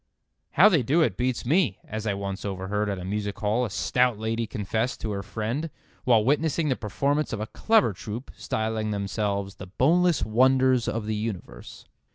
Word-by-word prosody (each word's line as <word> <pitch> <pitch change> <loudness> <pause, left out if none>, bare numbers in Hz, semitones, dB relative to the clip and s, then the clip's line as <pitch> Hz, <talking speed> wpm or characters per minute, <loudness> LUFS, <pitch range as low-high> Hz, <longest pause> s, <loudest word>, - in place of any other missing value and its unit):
"How - - +7
they 170 -9 +4
do 150 +8 +3
it - - 0
beats 125 0 -1
me," 145 - +2
as 110 +1 -4
I 100 - 0
once 100 -1 -5
overheard 100 +1 -2
at 100 - -2
a 90 - -7
music 100 +1 -3
hall 110 +4 0
a - - -4
stout 125 +3 +1
lady 110 +1 -2
confess 110 +4 -2
to 110 - -4
her 100 -1 -3
friend 110 - -3 0.4
while 115 -4 +4
witnessing 150 +3 +1
the 130 - +2
performance 140 +8 -1
of 115 - -3
a 110 - -2
clever 125 - +2
troup, 110 +7 -7
styling 110 0 -2
themselves 100 -1 -2
"The 95 - -9
Boneless 165 - +2
Wonders 130 +2 +3
of 115 -1 -2
the 110 - -2
Universe." 105 -3 -6
110 Hz, 185 wpm, -26 LUFS, 105-130 Hz, 0.4 s, How